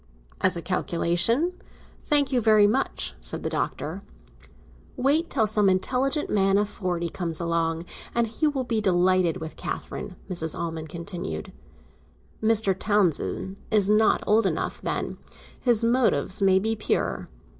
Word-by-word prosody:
"As 185 -2 +2
a 170 - -6
calculation? 185 - +1 0.5
Thank 290 -2 +3
you 250 -2 +2
very 215 -2 +5
much," 205 - 0
said - - -5
the - - -2
Doctor. - - -3 1.0
"Wait 300 +6 +2
till 220 - +2
some 210 -1 +3
intelligent 260 +10 0
man 195 -1 +2
of 205 0 +1
forty 180 -4 -3
comes 165 -2 -3
along, 165 -1 -1 0.3
and 235 0 +3
he 230 +7 -1
will 280 -3 -1
be 230 -3 -1
delighted 185 -2 +2
with 160 -2 -7
Catherine," - - -6
Mrs. 165 -4 -1
Almond 160 -2 -4
continued. 170 - -6 0.9
"Mr. 220 -3 +2
Townsend 190 -1 0
is 205 -2 +4
not 215 +1 +3
old 210 0 +3
enough, 165 -3 -3
then; - - -3 0.4
his 235 -3 +2
motives 230 - +2
may 190 -1 +5
be 220 +4 0
pure." 215 - -1
195 Hz, 140 wpm, -25 LUFS, 175-225 Hz, 1.0 s, very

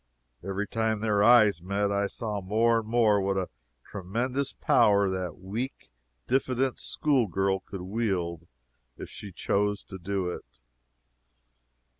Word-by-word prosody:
Every 100 +2 -3
time 110 -1 -1
their 105 -2 +1
eyes 110 -6 +6
met, 100 +3 -1
I 100 0 +1
saw 105 -1 -4
more 115 +4 +2
and 110 - -8
more 110 -4 +3
what 95 0 0
a 95 -1 -2 0.3
tremendous 125 +8 -2
power 100 -2 +3
that 90 -3 -4
weak, 100 - -6 0.3
diffident 130 -1 0
school 140 -7 +1
girl 95 +1 0
could 95 -1 -9
wield 90 -5 -2 0.5
if - - -8
she 100 - -9
chose 105 +3 -1
to 95 - -10
do 95 0 -2
it. - - -8
100 Hz, 135 wpm, -27 LUFS, 95-115 Hz, 0.5 s, eyes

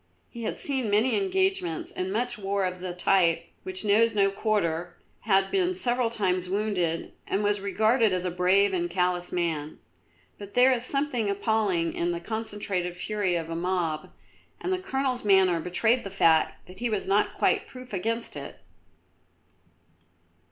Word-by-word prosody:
He 235 - -8
had - - -3
seen 265 -6 0
many 215 +5 +3
engagements 380 - 0
and 185 +1 -3
much 240 +3 -1
war 200 -1 -1
of 180 0 -4
the 180 0 -4
type 180 -2 +2 0.2
which 185 +2 -6
knows 220 +2 +3
no 195 -1 +3
quarter, 175 -5 -1 0.3
had 195 -2 +3
been 370 -1 +1
several 245 -8 +1
times 185 -5 -1
wounded, 190 -5 -1
and 200 +2 0
was 205 -1 +1
regarded 220 +3 +2
as 185 0 -1
a 180 - -1
brave 190 +3 +3
and 175 -1 -1
callous 180 0 0
man. 160 -4 -2 0.6
But 205 -1 -10
there 250 +2 +6
is 245 -2 0
something 255 -5 -1
appalling 200 -5 0
in 175 +1 -1
the 170 - -3
concentrated 200 -3 -3
fury 205 -2 -1
of 165 -1 -3
a - - -3
mob, 170 -3 -2 0.5
and 370 - -2
the 370 - -1
Colonel's 270 -8 -2
manner 190 -4 +4
betrayed 220 +9 +1
the 195 - -5
fact 165 -5 +2
that 185 +1 -13
he 240 0 -1
was 210 -3 -1
not 200 +2 +1
quite - - +1
proof 255 -3 -11
against 230 +5 -2
it. - - -8
200 Hz, 165 wpm, -27 LUFS, 180-230 Hz, 0.6 s, there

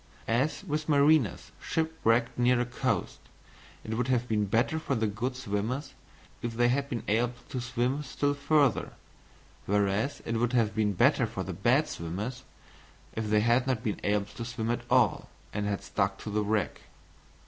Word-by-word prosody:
As 130 +11 0
with 155 -3 -3
mariners 145 - +3
shipwrecked 125 -8 +1
near 125 0 +3
a 120 - +1
coast, 125 -1 -2 0.6
it 110 - -4
would 120 +2 0
have 125 -2 +1
been 105 -2 +1
better 115 +10 +1
for 140 -3 -1
the 110 -2 +1
good 115 +5 -2
swimmers 125 +4 -3 0.5
if 120 -1 -3
they 120 0 +4
had 140 +2 0
been 115 - -3
able 120 +3 +1
to 130 - -3
swim 125 +3 -1
still 145 0 -1
further, 145 -3 +2 0.7
whereas 100 +6 +1
it 115 - -1
would 120 +2 0
have 115 -3 +2
been 105 -2 +1
better 85 - +3
for - - -4
the - - -5
bad - - +2
swimmers 105 +10 -5 0.7
if 110 -1 -3
they 105 0 +4
had 120 +3 +3
not 125 -3 0
been 105 -5 -2
able 105 0 +1
to 115 - -8
swim 115 -1 -2
at 120 - -1
all 125 -7 +3 0.2
and 105 0 -1
had 100 -1 -2
stuck - - -1
to 105 - -7
the 105 +1 +1
wreck. 105 -2 -1
120 Hz, 175 wpm, -29 LUFS, 110-130 Hz, 0.7 s, they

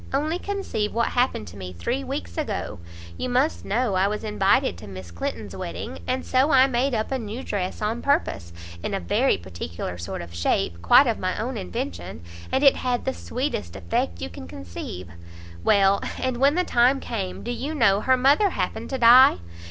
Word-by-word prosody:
Only 305 +5 0
conceive 390 - -3
what 235 0 +2
happened 245 - 0
to 95 - -12
me 90 -1 -7
three 85 +1 -2
weeks 85 -1 -5
ago! - - -3 0.4
you - - -3
must 255 +5 +1
know 230 +1 0
I 190 +1 +3
was 210 +2 -3
invited 210 - +2
to 105 - -10
Miss 95 -3 -9
Clinton's 85 - -5
wedding, 85 +3 -6
and 255 +1 -1
so 265 +3 +3
I 260 -3 +6
made 260 0 0
up 220 +3 -2
a 265 - 0
new 225 +3 -6
dress 190 +1 -3
on 225 +3 -1
purpose, 100 - 0 0.3
in - - -2
a - - -1
very 85 - +2
particular 85 0 -6
sort 85 0 -5
of 85 0 -11
shape, 85 0 0
quite 90 - +7
of - - 0
my - - -2
own - - -3
invention, 90 -2 -5 0.3
and 265 - +1
it 275 - +6
had 250 -1 -1
the 265 - 0
sweetest 170 - -4
effect 85 -1 -2
you 90 - -4
can 85 0 -9
conceive; 90 0 -7 0.6
well, 195 - +4 0.2
and 255 -2 -1
when 280 +4 +4
the 360 - +2
time 255 -2 +3
came, 195 -8 -4
do 240 - -3
you 280 +6 -4
know 205 -7 +4
her 260 +2 +3
mother 285 +11 +4
happened - - -3
to 265 - -2
die! 245 - +8
210 Hz, 195 wpm, -24 LUFS, -, 0.6 s, die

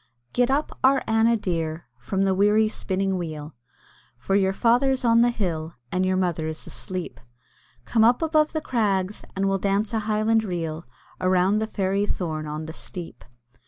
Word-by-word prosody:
"Get 245 0 +2
up, 285 +3 -1
our 270 +1 +4
Anna 225 +1 +3
dear, 165 -5 -3
from 190 +10 -1
the 195 -1 +2
weary 210 +3 +4
spinning 195 -2 -1
wheel; 155 -3 -6 0.6
For 160 +10 -3
your 195 -1 +3
father's 250 +5 +2
on 230 0 +5
the 240 - +5
hill, 170 -8 -3 0.2
and 185 +1 +1
your 185 0 +1
mother 170 -4 0
is 160 0 -6
asleep; 185 -2 -6 0.7
Come 225 -2 +2
up 240 +7 +4
above 310 -1 +2
the 315 - -1
crags, 205 -7 0
and 195 +1 0
we'll 195 0 +1
dance 200 +3 0
a 225 - +1
highland 215 +1 +1
reel 165 -5 -4 0.3
Around 185 +3 +2
the 220 - -1
fairy 200 -1 0
thorn 155 -6 -3
on 155 +1 -5
the 160 - -7
steep." 175 0 -8
195 Hz, 170 wpm, -24 LUFS, 175-225 Hz, 0.7 s, on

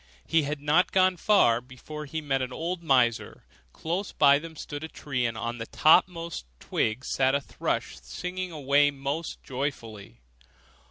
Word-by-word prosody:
He 165 - +3
had 145 0 -3
not 155 +5 +2
gone 185 -1 +4
far 160 - +3
before 140 +4 -9
he 160 +3 -4
met 135 -3 0
an 130 0 -3
old 170 +6 -3
miser: 125 -7 +1 0.3
close 175 - -3
by 140 -1 +5
them 160 +1 -10
stood 145 0 -7
a - - -4
tree, 130 -6 -2
and 115 -1 -5
on 120 +1 -4
the 115 - -5
topmost 165 - +2
twig 115 +4 -1
sat 135 +1 +2
a - - +2
thrush 65 - -3
singing 180 - -5
away 145 -1 +3
most 140 +3 -4
joyfully. 115 - -5
145 Hz, 160 wpm, -27 LUFS, 125-165 Hz, 0.3 s, by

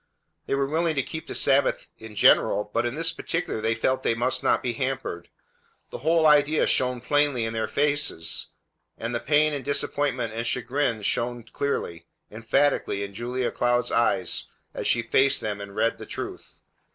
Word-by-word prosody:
They - - 0
were 140 0 +1
willing 160 +3 0
to 140 - +1
keep 160 +3 -7
the - - -6
Sabbath 140 0 +2
in 110 -1 -10
general, 105 +1 +4
but 120 - +1
in 120 - -4
this 165 +1 +1
particular 165 -7 -3
they 110 +1 +1
felt 130 +3 0
they 115 - +1
must 125 +3 0
not - - +2
be 125 - -1
hampered. 130 -9 -3 0.6
The - - -6
whole 160 +3 +2
idea 150 0 +4
shone 125 -1 +1
plainly 145 -3 +1
in 115 - -3
their 110 -1 -1
faces, 145 - 0 0.5
and 115 +2 -4
the 120 - 0
pain 150 +5 +2
and 140 -2 -4
disappointment 140 -4 -1
and 115 +1 -2
chagrin 120 -2 -1
shone 120 +3 -1
clearly, 85 -10 -4 0.2
emphatically 115 -1 0
in 100 0 -7
Julia 120 +3 -2
Cloud's 120 0 0
eyes 95 -6 +1 0.3
as - - -3
she 115 - +2
faced 135 +4 +3
them 105 -1 -4
and 100 0 -9
read 115 - 0
the - - -9
truth. - - -8
125 Hz, 175 wpm, -25 LUFS, 115-145 Hz, 0.6 s, general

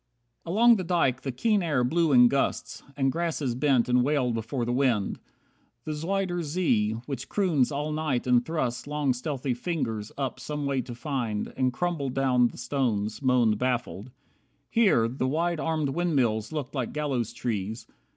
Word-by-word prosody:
65 165 - -4
Along 235 +4 +6
the 185 - -3
dyke 165 -8 +1
the 135 - -3
keen 210 - +1
air 150 -7 +1
blew 160 +5 +2
in 125 -2 +7
gusts, 140 +2 -1 0.2
And 135 -1 +2
grasses 155 -5 -1
bent 130 -1 +2
and 125 0 +3
wailed 135 -3 +1
before 115 +2 -2
the 120 - -1
wind. 125 -7 +1 0.7
The 155 - -3
Zuider 175 +3 -1
Zee, 145 -10 +1
which 135 -1 -5
croons 160 -10 +1
all 150 +2 -2
night 150 -5 -1
and 125 -1 +4
thrusts 125 -5 -2
Long 145 -3 0
stealthy 130 0 -3
fingers 120 -7 -3
up 130 -2 -3
some 150 +2 -4
way 135 -2 0
to 120 -1 -8
find 120 -6 -3
And 130 -1 +1
crumble 160 0 -2
down 130 -2 +3
the - - -10
stones, 115 -4 -1
moaned 120 -5 +3
baffled. 125 -3 -2 0.6
Here 200 - +4
The 130 +2 -2
wide 165 +4 0
armed 155 -3 0
windmills 135 -9 0
looked 150 -5 -4
like 130 -5 -3
gallows 135 -7 -1
trees. 110 -2 -4
135 Hz, 170 wpm, -27 LUFS, 120-155 Hz, 0.7 s, in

